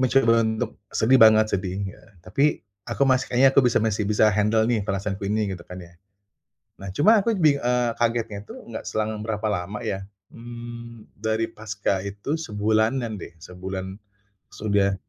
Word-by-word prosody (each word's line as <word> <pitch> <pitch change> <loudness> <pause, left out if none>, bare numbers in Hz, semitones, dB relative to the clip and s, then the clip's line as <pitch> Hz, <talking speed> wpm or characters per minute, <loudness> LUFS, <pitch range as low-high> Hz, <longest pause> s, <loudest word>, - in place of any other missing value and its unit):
mencoba 125 -3 +4
untuk 110 0 -2
sedih 130 +3 +3
banget, 110 -1 +7
sedih 95 -1 -2
ya. 95 - -8 0.2
Tapi, 145 +2 +1 0.2
aku 120 +4 -1
masih 130 -1 +2
"Kayaknya 125 +2 +5
aku - - +6
bisa - - +2
masih 105 -1 0
bisa 105 0 +4
handle 105 +2 +2
nih, 115 -1 +1
perasaanku 100 0 -3
ini," 105 -1 0
gitu 90 - -7
kan 90 - -8
ya. 85 -1 -13 0.9
Nah, 100 - -8
cuma 215 - +5
aku 230 0 +1
bing 155 -6 +3
eee, 125 -2 +1
kagetnya 115 -3 0
itu, - - -10
enggak 115 - -7
selang 110 0 -2
berapa 110 -1 -2
lama 100 +2 -3
ya, 95 0 -4 0.2
mmm, 120 -1 -10
dari 110 +1 0
paska 105 -3 -2
itu, 105 +10 -3
sebulanan 110 -2 0
deh, 85 - -10
sebulan 95 +2 -6 0.6
sudah, 100 -2 +1
110 Hz, 165 wpm, -24 LUFS, 100-120 Hz, 0.9 s, banget